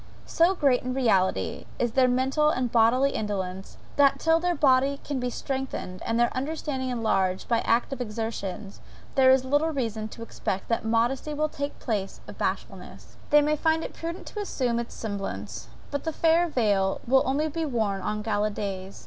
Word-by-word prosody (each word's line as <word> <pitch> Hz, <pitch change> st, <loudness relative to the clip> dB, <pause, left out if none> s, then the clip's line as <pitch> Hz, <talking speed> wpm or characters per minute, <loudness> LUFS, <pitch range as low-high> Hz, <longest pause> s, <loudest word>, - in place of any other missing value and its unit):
So 345 Hz, +3 st, +3 dB
great, 275 Hz, -7 st, +3 dB
in 255 Hz, 0 st, -3 dB
reality, 190 Hz, -, +1 dB
is 240 Hz, -1 st, 0 dB
their 255 Hz, +2 st, +4 dB
mental 265 Hz, +4 st, +2 dB
and 255 Hz, -5 st, -1 dB
bodily 245 Hz, +4 st, +4 dB
indolence, 195 Hz, -4 st, -4 dB, 0.2 s
that 280 Hz, -1 st, +5 dB
till 325 Hz, 0 st, +3 dB
their 355 Hz, +1 st, 0 dB
body 275 Hz, 0 st, +3 dB, 0.2 s
be 250 Hz, 0 st, -1 dB
strengthened 265 Hz, -8 st, -4 dB
and 230 Hz, +1 st, 0 dB
their 240 Hz, -, +2 dB
understanding 270 Hz, -1 st, -3 dB
enlarged 195 Hz, -6 st, 0 dB
by 230 Hz, -1 st, +2 dB
active 245 Hz, +4 st, 0 dB
exertions, 215 Hz, -3 st, -5 dB, 0.3 s
there 265 Hz, -2 st, +5 dB
is 260 Hz, 0 st, +5 dB
little 290 Hz, +4 st, +2 dB
reason 225 Hz, -7 st, -2 dB
to 230 Hz, +1 st, -9 dB
expect 195 Hz, -4 st, -4 dB
that 230 Hz, -, 0 dB
modesty 240 Hz, +6 st, 0 dB
will 305 Hz, +1 st, 0 dB
take 285 Hz, 0 st, -5 dB
place 205 Hz, -5 st, -3 dB
of -, -, -11 dB
bashfulness. -, -, -5 dB
They 295 Hz, 0 st, +6 dB
may 300 Hz, +1 st, +2 dB
find 320 Hz, +1 st, +1 dB
it -, -, -6 dB
prudent 335 Hz, +1 st, -6 dB
to 420 Hz, -, -6 dB
assume 250 Hz, -11 st, -1 dB
its 235 Hz, -, -6 dB
semblance; 110 Hz, -, -5 dB, 0.2 s
but 285 Hz, -, -2 dB
the 320 Hz, -, -2 dB
fair 335 Hz, +2 st, +3 dB
veil 205 Hz, -, +1 dB
will 265 Hz, +2 st, +4 dB
only 285 Hz, +4 st, 0 dB
be 325 Hz, +2 st, -3 dB
worn 220 Hz, -9 st, -1 dB
on 210 Hz, +2 st, -2 dB
gala 210 Hz, -1 st, 0 dB
days. 195 Hz, -2 st, -5 dB
250 Hz, 175 wpm, -26 LUFS, 215-285 Hz, 0.3 s, They